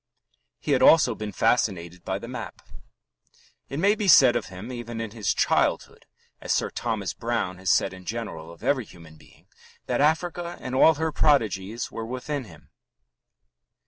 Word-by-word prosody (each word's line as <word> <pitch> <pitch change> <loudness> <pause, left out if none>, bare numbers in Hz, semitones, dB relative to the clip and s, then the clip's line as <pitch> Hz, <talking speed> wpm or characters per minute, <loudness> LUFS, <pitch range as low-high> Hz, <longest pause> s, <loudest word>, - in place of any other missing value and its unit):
He - - -4
had - - +3
also 155 -7 +6
been 105 -1 -6
fascinated 90 -6 0
by 95 0 -2
the 115 - -9
map. 125 +1 -8 1.1
It 140 - -5
may 200 +4 +4
be 210 -1 -2
said 130 -8 +7
of 120 - -2
him 95 +6 -9
even 120 -2 -6
in 115 -2 -4
his 110 -2 -1
childhood, - - 0 0.3
as - - -4
Sir - - 0
Thomas 110 -5 -3
Browne 115 -6 -3
has 95 -1 -2
said - - +3
in 95 -1 -12
general 95 -8 -6
of 85 - -15
every 130 -5 +1
human 85 -4 -15
being, - - -21 0.4
that - - 0
Africa 170 +3 0
and 130 - -6
all 155 +4 +5
her 160 +2 -1
prodigies 115 -8 +1
were 115 - -5
within 130 +3 -4
him. 80 -7 -17
115 Hz, 170 wpm, -25 LUFS, 95-140 Hz, 1.1 s, said